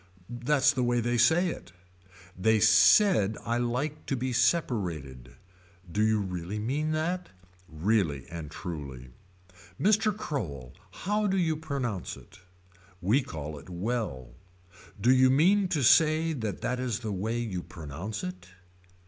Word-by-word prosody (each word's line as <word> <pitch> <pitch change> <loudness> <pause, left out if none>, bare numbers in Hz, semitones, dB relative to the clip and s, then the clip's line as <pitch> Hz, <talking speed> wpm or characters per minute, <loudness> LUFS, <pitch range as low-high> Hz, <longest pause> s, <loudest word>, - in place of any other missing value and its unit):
That's 140 0 +3
the 130 - -1
way 120 0 +1
they 120 +1 0
say 175 +8 +4
it. 90 - -8 0.6
They 110 +4 +2
said 110 - +5
I 120 +1 0
like 125 +5 -2
to 135 - 0
be 130 0 -2
separated. 85 - -1 0.6
Do 105 - 0
you 110 0 +3
really 90 0 -4
mean 140 +8 -1
that. 175 +4 -2 0.4
Really 80 -4 0
and 80 -3 -6
truly. 70 -9 -7 0.7
Mr. 215 +2 +3
Crowell. 70 - -5 0.2
How 210 +2 -1
do 195 0 +1
you 165 -4 +1
pronounce 135 - -4
it. - - -17 0.6
We 105 - +2
call 75 - -7
it 70 - -15
well. 90 - -3 0.7
Do 120 +5 +4
you 130 0 +5
mean 185 +9 +4
to 160 -6 -1
say 160 +4 +4
that 110 -8 -4
that 125 0 -2
is 125 -5 -2
the 110 -2 -4
way 105 +5 -2
you 105 -7 -3
pronounce 85 +6 -7
it. 90 0 -7
115 Hz, 140 wpm, -28 LUFS, 90-145 Hz, 0.7 s, said